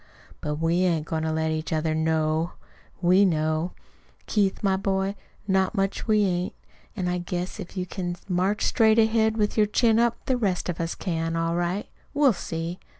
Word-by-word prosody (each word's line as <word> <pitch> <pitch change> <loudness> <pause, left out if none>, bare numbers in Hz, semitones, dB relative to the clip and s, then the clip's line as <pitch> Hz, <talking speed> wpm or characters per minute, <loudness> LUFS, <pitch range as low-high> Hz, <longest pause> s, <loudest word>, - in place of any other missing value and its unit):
But 150 0 -2
we 165 +2 +1
ain't 170 -4 +1
goin' 160 -1 -2
to 160 0 -1
let 160 0 0
each 155 0 -3
other 155 0 0
KNOW 160 +1 0 0.5
we 185 +3 +5
know, 155 -1 +1 0.5
Keith, 200 -2 0
my 195 -1 +3
boy. 195 0 0 0.3
Not 190 +1 +2
much 195 -1 -1
we 215 -1 +4
ain't! 180 -1 -1 0.4
An' 185 -4 -2
I 180 0 0
guess 180 +3 -4
if 195 0 -8
you 180 - -1
can 175 -1 -4
march 190 +3 +1
straight 220 -2 +4
ahead 220 0 +3
with 210 0 0
your 210 -1 +4
chin 225 +1 +3
up, 235 0 +2
the 260 - +1
rest 195 -6 -1
of 170 -1 -2
us 165 0 -2
can, 165 -2 -2
all 165 0 0
right. 175 +3 -1 0.3
We'll 285 -4 +5
see!" 170 0 -4
180 Hz, 185 wpm, -25 LUFS, 165-205 Hz, 0.5 s, we